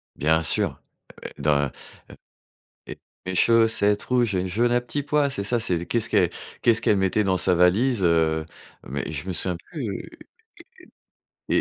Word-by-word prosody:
Bien 80 Hz, +2 st, +2 dB
sûr. 80 Hz, -, 0 dB, 0.3 s
Ah -, -, -15 dB
ouais, -, -, -7 dB
dans, 70 Hz, -2 st, +2 dB
heu -, -, -11 dB, 1.5 s
et 95 Hz, 0 st, -3 dB
chaussette 110 Hz, -1 st, +3 dB
rouge 120 Hz, -5 st, +1 dB
et 90 Hz, -, +1 dB
une 95 Hz, -, -2 dB
jaune 115 Hz, +6 st, +1 dB
à 120 Hz, -, +3 dB
petits 140 Hz, +4 st, -4 dB
pois, 145 Hz, -1 st, +1 dB
c'est 100 Hz, -6 st, -4 dB
ça? 120 Hz, +3 st, 0 dB
C'est 85 Hz, -6 st, -2 dB
qu'est-ce 115 Hz, +2 st, -1 dB
qu -, -, +3 dB, 0.3 s
qu'est-ce 115 Hz, -1 st, +3 dB
qu'elle 105 Hz, -, +3 dB
mettait 95 Hz, +2 st, +1 dB
dans 95 Hz, -1 st, +2 dB
sa 90 Hz, +1 st, +2 dB
valise, 100 Hz, +7 st, +3 dB
heu 80 Hz, -2 st, +2 dB, 0.4 s
mais -, -, -4 dB
je 80 Hz, +4 st, -5 dB
me 95 Hz, -, -2 dB
souviens 90 Hz, 0 st, -2 dB
plus 125 Hz, -, -5 dB, 1.4 s
et -, -, +3 dB
100 Hz, 170 wpm, -24 LUFS, 85-120 Hz, 1.5 s, chaussette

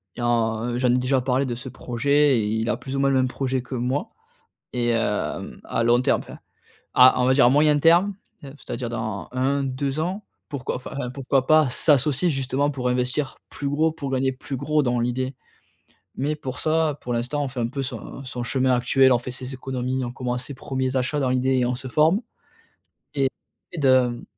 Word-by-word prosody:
et 120 Hz, -, -6 dB
en 120 Hz, 0 st, 0 dB
j'en 125 Hz, 0 st, +2 dB
ai 125 Hz, -, +3 dB
déjà 125 Hz, +1 st, +1 dB
parlé 130 Hz, +1 st, +1 dB
de 120 Hz, -2 st, -3 dB
ce 130 Hz, +2 st, -7 dB
projet 140 Hz, +3 st, +2 dB
et 110 Hz, -, +1 dB
il 110 Hz, +1 st, -1 dB
a -, -, +1 dB
plus 135 Hz, 0 st, -6 dB
ou 135 Hz, -, 0 dB
moins 140 Hz, 0 st, +3 dB
le 135 Hz, -, +2 dB
même 130 Hz, -1 st, +3 dB
projet 130 Hz, -1 st, -2 dB
que 130 Hz, +1 st, -7 dB
moi. 125 Hz, +4 st, -1 dB, 0.6 s
Et 120 Hz, -1 st, 0 dB
hem, 115 Hz, -3 st, -1 dB
à -, -, -1 dB
long 120 Hz, +1 st, +4 dB
terme, 130 Hz, -, +2 dB
enfin, -, -, -11 dB, 0.6 s
à 125 Hz, 0 st, +6 dB
on -, -, +3 dB
va 130 Hz, -, +4 dB
dire, 135 Hz, -, +5 dB
à 120 Hz, -, +6 dB
moyen 150 Hz, +2 st, +4 dB
terme, 170 Hz, +6 st, +4 dB, 0.3 s
heu, 135 Hz, -, -8 dB
f -, -, -14 dB
c'est-à-dire 120 Hz, 0 st, -5 dB
dans 110 Hz, -4 st, -4 dB
1-2 135 Hz, +2 st, -1 dB
ans, 185 Hz, +6 st, -2 dB, 0.3 s
pourquoi, 140 Hz, -3 st, -4 dB
enfin, 125 Hz, 0 st, -5 dB
pourquoi 135 Hz, -1 st, 0 dB
pas 155 Hz, -3 st, +5 dB
s'associer 145 Hz, +4 st, +2 dB
justement 135 Hz, 0 st, 0 dB
pour 125 Hz, -3 st, -3 dB
investir 125 Hz, +3 st, -1 dB
plus 140 Hz, -, -5 dB
gros, 155 Hz, +3 st, +2 dB
pour 145 Hz, -4 st, -6 dB
gagner 130 Hz, 0 st, +1 dB
plus 130 Hz, +1 st, -6 dB
gros, 150 Hz, +3 st, +1 dB
dans 120 Hz, -2 st, 0 dB
l'idée. 130 Hz, +2 st, -2 dB, 0.8 s
Mais 150 Hz, +3 st, -1 dB
pour 130 Hz, -4 st, -6 dB
ça, 155 Hz, -2 st, +1 dB
pour 125 Hz, -, -5 dB
l'instant 125 Hz, +5 st, -1 dB
on 140 Hz, -, -2 dB
fait 125 Hz, -1 st, -6 dB
un 115 Hz, -, 0 dB
peu 135 Hz, +3 st, -4 dB
son 130 Hz, +1 st, -7 dB
son 125 Hz, -2 st, -5 dB
chemin 130 Hz, +1 st, +1 dB
actuel, 130 Hz, +2 st, +4 dB
on 120 Hz, -, +4 dB
fait 125 Hz, +1 st, -6 dB
ses 130 Hz, +1 st, -6 dB
économies, 130 Hz, 0 st, -3 dB
on 120 Hz, -, -5 dB
commence 125 Hz, 0 st, -3 dB
ses 140 Hz, -, -7 dB
premiers 130 Hz, 0 st, -3 dB
achats, 130 Hz, +3 st, 0 dB
dans 135 Hz, -2 st, +1 dB
l'idée, 130 Hz, +1 st, +1 dB
et 125 Hz, -, +2 dB
on 125 Hz, +1 st, 0 dB
se 130 Hz, +1 st, -7 dB
forme. 160 Hz, -, +3 dB, 0.9 s
Et 135 Hz, -2 st, +1 dB, 0.4 s
et -, -, -8 dB
de 130 Hz, -3 st, +3 dB
130 Hz, 210 wpm, -23 LUFS, 125-140 Hz, 0.9 s, à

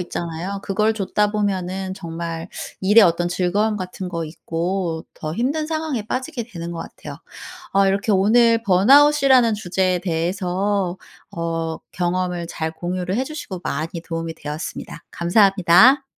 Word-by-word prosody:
있잖아요. 175 Hz, +2 st, -4 dB
그걸 215 Hz, +2 st, +1 dB
좇다 210 Hz, 0 st, 0 dB
보면은 190 Hz, -2 st, -2 dB
정말 165 Hz, -1 st, -6 dB, 0.3 s
일의 210 Hz, +4 st, +6 dB
어떤 175 Hz, 0 st, +2 dB
즐거움 200 Hz, +5 st, 0 dB
같은 185 Hz, -1 st, -6 dB
거 170 Hz, -2 st, -3 dB
잊고 165 Hz, +1 st, -3 dB
더 155 Hz, -1 st, -5 dB
힘든 285 Hz, +7 st, -1 dB
상황에 310 Hz, -9 st, -2 dB
빠지게 255 Hz, -2 st, -3 dB
되는 170 Hz, -1 st, -6 dB
것 170 Hz, -, -6 dB
같아요. -, -, -9 dB, 0.5 s
어 195 Hz, 0 st, +4 dB
이렇게 200 Hz, +3 st, +1 dB
오늘 230 Hz, +4 st, +4 dB
번아웃이라는 260 Hz, +4 st, +5 dB
주제에 185 Hz, -2 st, 0 dB
대해서 185 Hz, +2 st, -1 dB, 0.3 s
어 165 Hz, -1 st, -3 dB, 0.2 s
경험을 180 Hz, -1 st, -1 dB
잘 160 Hz, 0 st, -3 dB
공유를 180 Hz, +2 st, -3 dB
해 255 Hz, -, +1 dB
주시고 260 Hz, -, -7 dB
많이 160 Hz, +4 st, -3 dB
도움이 165 Hz, -1 st, -4 dB
되었습니다. 150 Hz, +2 st, -7 dB
감사합니다. 195 Hz, +7 st, +5 dB
185 Hz, 315 characters per minute, -21 LUFS, 170-210 Hz, 0.5 s, 일의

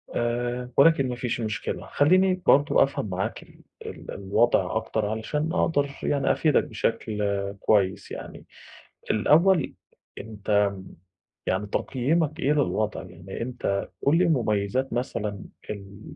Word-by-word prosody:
آآ 120 Hz, +1 st, -1 dB
ولكن 140 Hz, -3 st, +5 dB
ما 125 Hz, -, -3 dB
فيش 125 Hz, -1 st, -3 dB
مشكلة 105 Hz, -1 st, -3 dB
خلّيني 185 Hz, +5 st, +3 dB
برضه 145 Hz, +1 st, +5 dB
أفهَم 135 Hz, -6 st, -3 dB
معاك 95 Hz, +1 st, -3 dB
ال -, -, -20 dB, 0.3 s
ال -, -, -8 dB
الوضْع 100 Hz, 0 st, +1 dB
أكتر 110 Hz, -1 st, -1 dB
علشان 150 Hz, -, -2 dB
أقدَر 145 Hz, -6 st, +1 dB
يعني 140 Hz, -1 st, +1 dB
أفيدك 155 Hz, -2 st, +3 dB
بشكل 110 Hz, -4 st, -2 dB, 0.4 s
كويس 95 Hz, -3 st, +1 dB
يعني، -, -, -8 dB, 0.7 s
الأول 160 Hz, -, +3 dB, 0.4 s
أنت 105 Hz, -1 st, -8 dB, 0.2 s
م 95 Hz, -1 st, -10 dB, 0.6 s
يعني 95 Hz, +3 st, 0 dB
تقييمك 150 Hz, +8 st, 0 dB
إيه 145 Hz, -, +2 dB
للوضع؟ 110 Hz, -9 st, 0 dB
يعني 90 Hz, +4 st, -8 dB
أنت 115 Hz, -5 st, -2 dB
قُل 150 Hz, +4 st, +3 dB
لي 180 Hz, -, +4 dB
مميّزات 125 Hz, -, 0 dB
مثلًا 105 Hz, -5 st, -3 dB, 0.3 s
ال 100 Hz, 0 st, -8 dB
120 Hz, 125 wpm, -25 LUFS, 105-145 Hz, 0.7 s, ولكن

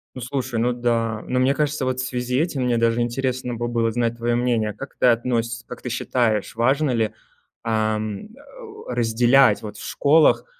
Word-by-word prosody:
Ну, 130 Hz, -, -7 dB
слушай, 125 Hz, -1 st, -3 dB
ну 120 Hz, +1 st, +2 dB
да. 115 Hz, -2 st, -1 dB
Но 125 Hz, -, 0 dB
мне 130 Hz, +2 st, +3 dB
кажется, 150 Hz, -1 st, -1 dB
вот 130 Hz, 0 st, -1 dB
в 130 Hz, -, -1 dB
связи 125 Hz, 0 st, -1 dB
этим 155 Hz, -5 st, -1 dB
мне 120 Hz, -1 st, +1 dB
даже 115 Hz, +1 st, +2 dB
интересно 125 Hz, +1 st, -2 dB
бы 120 Hz, +1 st, -3 dB
было 115 Hz, -1 st, 0 dB
знать 115 Hz, 0 st, -1 dB
твое 120 Hz, 0 st, -1 dB
мнение. 120 Hz, -3 st, +1 dB
А -, -, -5 dB
как 140 Hz, -, -9 dB
ты -, -, +3 dB
относь 115 Hz, -1 st, 0 dB
как 125 Hz, -, -9 dB
ты 125 Hz, -, -5 dB
считаешь, 115 Hz, -3 st, -1 dB
важно 135 Hz, +5 st, +2 dB
ли, 110 Hz, -3 st, 0 dB, 0.5 s
ам, 110 Hz, -2 st, -1 dB
э, -, -, -25 dB, 0.6 s
разделять 120 Hz, 0 st, +3 dB
вот 105 Hz, -, -8 dB
в -, -, -10 dB
школах, 155 Hz, +2 st, +3 dB
120 Hz, 195 wpm, -22 LUFS, 115-130 Hz, 0.6 s, мне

